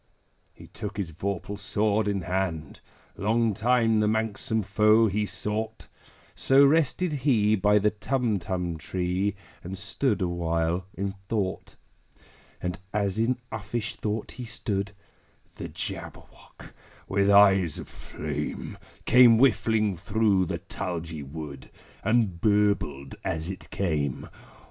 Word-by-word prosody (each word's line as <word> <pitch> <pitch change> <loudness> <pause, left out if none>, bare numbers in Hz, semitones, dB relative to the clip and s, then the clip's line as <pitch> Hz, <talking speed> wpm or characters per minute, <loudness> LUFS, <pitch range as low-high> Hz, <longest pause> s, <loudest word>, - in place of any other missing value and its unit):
He - - -14
took 105 -1 -7
his 95 -5 -3
vorpal 100 +4 -4
sword 105 +1 +1
in 100 -2 0
hand: 90 -4 -2 0.4
Long 110 +2 +2
time 115 0 +2
the 105 - +2
manxome 110 0 0
foe 105 +3 +4
he 105 0 0
sought 105 +2 -4 0.5
So 135 +1 +5
rested 160 +3 +2
he 120 -7 +3
by 105 +1 +3
the 105 +1 +3
Tumtum 100 -8 -1
tree, 90 +4 -1 0.3
And 95 +2 -6
stood 100 +5 -1
awhile 85 0 -1
in 100 0 -2 0.2
thought. 100 -5 -2 0.8
And, 90 0 -4
as 100 -1 -1
in 120 +3 +2
uffish 110 +1 -4
thought 105 0 -3
he 125 - -7
stood, 100 -3 -3 0.6
The - - -6
Jabberwock, - - -8 0.3
with 100 +1 +2
eyes 95 -5 +5
of - - -7
flame, 75 -1 -5 0.3
Came 125 -2 +7
whiffling 110 -5 +3
through 100 -1 +2
the - - -2
tulgey 80 -3 -5
wood, 70 -1 -8 0.3
And 110 -5 +1
burbled 100 -10 +1
as 80 +3 -2
it 95 - -10
came! 75 -8 -2
100 Hz, 120 wpm, -27 LUFS, 90-110 Hz, 0.8 s, Came